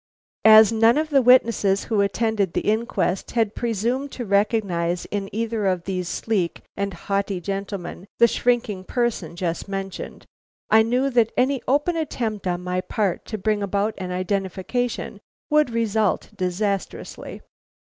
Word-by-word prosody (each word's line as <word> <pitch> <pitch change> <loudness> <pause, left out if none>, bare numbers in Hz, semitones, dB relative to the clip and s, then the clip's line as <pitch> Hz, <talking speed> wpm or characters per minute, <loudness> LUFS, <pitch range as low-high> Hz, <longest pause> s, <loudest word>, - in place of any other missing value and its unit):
"As 220 -1 +9
none 225 +3 +4
of 310 0 -1
the 275 -2 +5
witnesses 230 -5 +4
who 215 -3 +1
attended 200 -2 0
the - - 0
inquest 215 -3 -1
had 220 -2 +2
presumed 240 +5 -2
to 245 - -5
recognize 200 -4 0
in 200 -1 -4
either 225 -1 -1
of 185 -2 0
these 185 -2 -3
sleek 195 -7 -1
and 200 0 -2
haughty 195 +1 -2
gentlemen 195 0 -5
the 235 - +6
shrinking 235 -5 0
person 210 -7 -2
just 175 0 -3
mentioned, 195 -1 -6 0.5
I 220 - +7
knew 250 +5 +1
that 235 -3 +3
any 260 0 +2
open 295 +6 +2
attempt 230 - -3
on 180 0 -2
my 180 0 -1
part 195 -2 -2
to 215 - -5
bring 210 +1 0
about 200 +2 0
an 185 -1 -4
identification 190 +6 -2 0.3
would 300 -2 +4
result 220 -3 0
disastrously. 190 +2 -3
210 Hz, 145 wpm, -23 LUFS, 190-235 Hz, 0.5 s, As